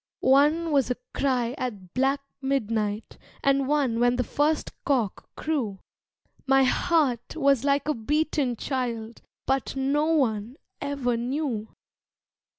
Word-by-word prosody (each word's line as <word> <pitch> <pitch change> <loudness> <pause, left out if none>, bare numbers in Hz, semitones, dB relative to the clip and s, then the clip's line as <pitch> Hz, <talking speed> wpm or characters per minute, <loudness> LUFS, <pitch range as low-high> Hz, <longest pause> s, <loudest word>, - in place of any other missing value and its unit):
One 305 +4 +4
was 275 -4 +3
a 250 - -1 0.2
cry 250 -3 0
at 200 -8 -5
black 270 +2 +1 0.2
midnight 225 -6 -1 0.2
And 275 -1 +3
one 275 -6 +1
when 245 0 +3
the 250 - +1
first 295 +4 0
cock 245 -9 -1
crew 260 -11 -2 0.7
My 270 0 +5
heart 265 -3 +1
was 275 -5 +3
like 280 +1 +1
a 305 - +2
beaten 290 +1 0
child, 235 -3 -3 0.2
But 270 0 0
no 275 +3 +1
one 245 -7 +1 0.3
ever 275 -4 -1
knew. 245 -3 -3
265 Hz, 125 wpm, -26 LUFS, 235-285 Hz, 0.7 s, My